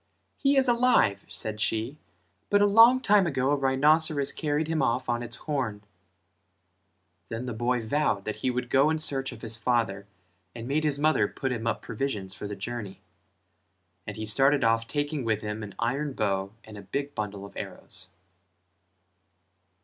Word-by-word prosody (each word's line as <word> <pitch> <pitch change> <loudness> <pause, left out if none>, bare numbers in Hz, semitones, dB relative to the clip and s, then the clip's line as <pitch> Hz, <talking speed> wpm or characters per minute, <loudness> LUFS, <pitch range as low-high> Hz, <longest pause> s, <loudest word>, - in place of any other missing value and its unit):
"He 275 0 +2
is 265 -1 +4
alive" 240 - +3
said 110 -1 -5
she 115 +7 -1 0.5
"but 205 - +4
a 205 - +5
long 230 +5 +7
time 205 -6 +4
ago 135 -3 0
a - - +4
rhinoceros 145 +2 +3
carried 150 0 -1
him 160 -1 0
off 120 +2 0
on 120 -1 0
its 120 0 -6
horn." 120 -10 -3 1.5
Then 115 +2 -4
the 125 - -4
boy 120 +2 0
vowed 110 -6 0
that 110 -1 -3
he 120 - -1
would 125 -1 -3
go 140 +3 +4
in 160 - +1
search 140 -4 0
of 120 -1 -12
his 115 -1 -2
father 115 -4 0 0.5
and 115 0 -7
made 150 +3 0
his 150 -2 +1
mother 145 -8 +3
put 135 +4 -4
him 115 -2 -3
up 115 - -1
provisions 105 -6 -3
for 105 - -6
the 105 - -5
journey; 100 -1 -6 1.1
and 105 - -6
he 110 - -4
started 135 +6 +3
off 115 0 +2
taking 145 -1 -2
with 110 -2 0
him 105 0 -4
an 105 -2 -8
iron 135 +5 -1
bow 100 -4 -1
and 105 -1 -11
a - - -9
big 140 +8 -4
bundle 100 -2 -5
of 100 - -13
arrows. 95 - -7
125 Hz, 175 wpm, -27 LUFS, 110-145 Hz, 1.5 s, long